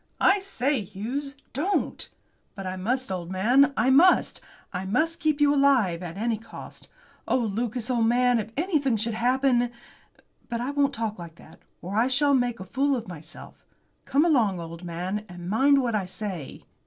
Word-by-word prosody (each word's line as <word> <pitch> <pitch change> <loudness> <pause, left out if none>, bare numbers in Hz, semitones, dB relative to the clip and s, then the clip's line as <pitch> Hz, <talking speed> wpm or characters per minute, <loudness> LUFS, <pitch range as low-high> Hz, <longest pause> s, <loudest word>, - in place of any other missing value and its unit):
"I 390 +2 +5
say, 285 - -1
Hughes, 255 +9 -5 0.2
don't!" 355 +10 -1 0.5
"But 195 - -7
I 185 0 -3
must, 240 +5 -2
old 175 -2 -4
man, 245 +9 +4
I 250 +4 +3
must. 350 +8 +4 0.3
I 180 0 -3
must 310 +13 0
keep 305 -1 +1
you 290 -1 +4
alive, 260 -12 +3
at 175 0 -7
any 225 0 -1
cost. 225 - -11 0.4
Oh, - - +2
Lucas, 235 +1 -2
old 235 -3 +2
man, 245 0 +3
if 215 - -4
anything 295 - +1
should 225 +2 -2
happen 245 +1 +2 0.8
But 235 - -2
I 250 +4 -2
won't 285 -1 +1
talk 220 -3 -3
like 170 -2 -9
that, - - -17 0.2
or 185 +3 -5
I 230 +3 +3
shall 280 +2 +2
make 245 -3 +1
a 185 - -7
fool 275 +5 +1
of 235 -4 -5
myself. 165 -4 -10 0.4
Come 290 +4 +2
along, 230 - +2
old 165 +1 -8
man, 180 +4 -4
and 175 0 -9
mind 270 +7 +4
what 235 -2 -1
I 200 -4 -1
say. 185 -6 -6
235 Hz, 180 wpm, -26 LUFS, 195-275 Hz, 0.8 s, I